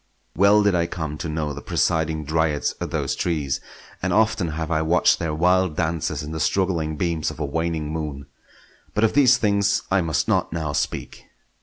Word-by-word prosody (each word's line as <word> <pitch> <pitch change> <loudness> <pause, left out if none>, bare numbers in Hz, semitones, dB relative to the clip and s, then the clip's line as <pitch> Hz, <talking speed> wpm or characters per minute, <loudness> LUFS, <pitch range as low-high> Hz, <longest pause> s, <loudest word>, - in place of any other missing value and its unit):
Well 100 +3 +5
did 100 -1 +3
I 85 -1 +1
come 75 -4 -5
to 85 - -4
know 75 -1 -2
the 70 - -8
presiding 80 -2 0
dryads 80 -1 0
of - - -3
those - - -1
trees, 75 -6 -1 0.4
and 95 - -1
often 110 -2 +2
have 80 +1 -4
I 80 -1 +2
watched 85 +3 +3
their 80 -2 -2
wild 90 0 +2
dances 80 -2 -1
in 75 - -6
the 80 - -4
struggling 80 -3 0
beams 85 -3 -1
of - - -9
a 75 - -1
waning 80 +1 -2
moon—but 75 +7 -7
of 110 - +3
these 130 -3 +5
things 100 -1 +1
I 95 0 +3
must 80 -3 0
not - - +1
now 80 -3 -3
speak. - - -3
80 Hz, 185 wpm, -23 LUFS, 75-90 Hz, 0.4 s, Well